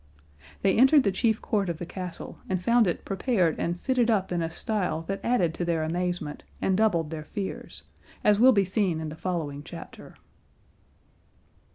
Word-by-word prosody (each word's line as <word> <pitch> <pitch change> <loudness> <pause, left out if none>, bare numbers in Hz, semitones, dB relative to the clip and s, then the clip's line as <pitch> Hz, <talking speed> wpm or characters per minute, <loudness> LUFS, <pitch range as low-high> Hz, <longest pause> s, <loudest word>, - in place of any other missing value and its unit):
They 195 -1 +3
entered 265 +4 +6
the 200 - +2
chief 220 +3 0
court 200 -4 0
of 170 - -3
the 175 - -5
castle 180 -1 -7
and 185 -1 0
found 235 +3 +3
it 175 - -2
prepared 190 - +1
and 175 +1 -1
fitted 250 -1 +1
up 195 -5 +1
in 175 -1 0
a 165 - -1
style 180 -2 -2
that 195 +3 -4
added 185 -9 +2
to 175 - -3
their 170 -2 0
amazement 175 -2 -2 0.2
and 190 - +1
doubled 170 -7 +2
their 155 -1 -5
fears, 195 +4 -6 0.4
as 210 -1 +4
will 255 +3 +8
be 200 -5 +3
seen 185 -3 0
in 160 -1 -4
the 155 - -7
following 160 -5 -3
chapter. - - -10
185 Hz, 180 wpm, -27 LUFS, 165-215 Hz, 0.4 s, will